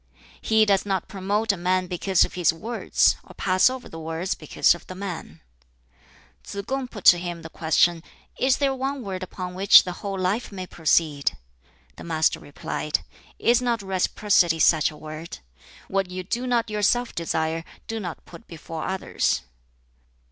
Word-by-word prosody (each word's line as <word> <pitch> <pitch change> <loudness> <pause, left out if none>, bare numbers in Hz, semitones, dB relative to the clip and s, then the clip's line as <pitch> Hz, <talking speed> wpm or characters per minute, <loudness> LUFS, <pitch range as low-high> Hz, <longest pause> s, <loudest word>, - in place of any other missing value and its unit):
"He 220 -1 +4
does 200 -2 +3
not 195 -3 -2
promote 205 +3 0
a 200 - -4
man 185 +1 +1
because 180 +1 +2
of - - -9
his 175 -3 +3
words, 225 +9 +1
or - - -15
pass 185 +4 +3
over 260 -1 -6
the 165 - -9
words 165 +3 -3
because 155 - +2
of 175 - -12
the 185 - -8
man." 180 - -7 1.0
Tsz 200 0 -6
kung 270 -1 -2
put 210 -6 -10
to 175 - +8
him 175 -1 -5
the 160 - -9
question, 165 +1 +2 0.4
"Is 260 0 +3
there 275 -2 +1
one 265 0 -3
word 190 -2 -5
upon 185 0 -6
which 195 +2 +7
the 180 - -4
whole 200 -2 -3
life 190 +6 -1
may 185 -2 -6
proceed?" 155 - +1 0.6
The - - -9
Master 160 -1 +1
replied, 150 +1 -3 0.4
"Is 240 +2 +3
not 235 -4 0
Reciprocity 190 -2 +2
such 160 -1 +4
a 150 - -12
word? 155 +2 -8 0.5
what 195 -1 -1
you 185 0 -5
do 240 +7 -3
not 235 -3 0
yourself 215 +4 +1
desire, 160 -1 -1 0.2
do 225 -1 -4
not 175 -5 -7
put 230 - -14
before 165 -1 -7
others." 190 - -1
185 Hz, 170 wpm, -24 LUFS, 165-210 Hz, 1.0 s, to